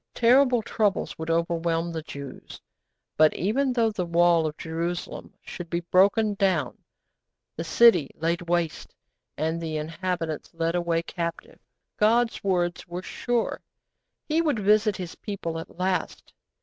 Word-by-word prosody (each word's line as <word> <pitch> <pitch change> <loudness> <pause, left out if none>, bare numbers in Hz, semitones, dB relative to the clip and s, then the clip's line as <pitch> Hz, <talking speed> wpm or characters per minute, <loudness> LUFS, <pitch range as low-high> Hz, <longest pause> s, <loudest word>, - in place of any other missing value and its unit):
Terrible 245 0 +4
troubles 210 -2 0
would 160 0 -5
overwhelm 170 0 0
the 160 -1 -4
Jews; 140 -3 -9 0.6
but, 155 0 +5
even 255 +9 +1
though 230 -3 +2
the 200 -4 -2
wall 170 -1 +3
of 155 - -6
Jerusalem 170 +2 -4
should 175 -2 -8
be 170 0 -1
broken 205 +3 +4
down, 185 -9 0 0.8
the 165 - -4
city 175 -3 +5
laid 170 +2 -1
waste, 170 -2 -1 0.4
and 160 +2 -1
the 160 -2 -3
inhabitants 165 0 -4
led 165 0 0
away 170 -1 0
captive, 170 0 -5 0.4
God's 230 +2 +2
words 175 -3 0
were 175 +1 -6
sure. 240 +3 -2 0.7
He 320 +1 +2
would 300 -7 +1
visit 210 0 +3
His 180 -3 -6
people 170 -6 -5
at 165 - -10
last. 185 0 -2
175 Hz, 135 wpm, -26 LUFS, 165-210 Hz, 0.8 s, but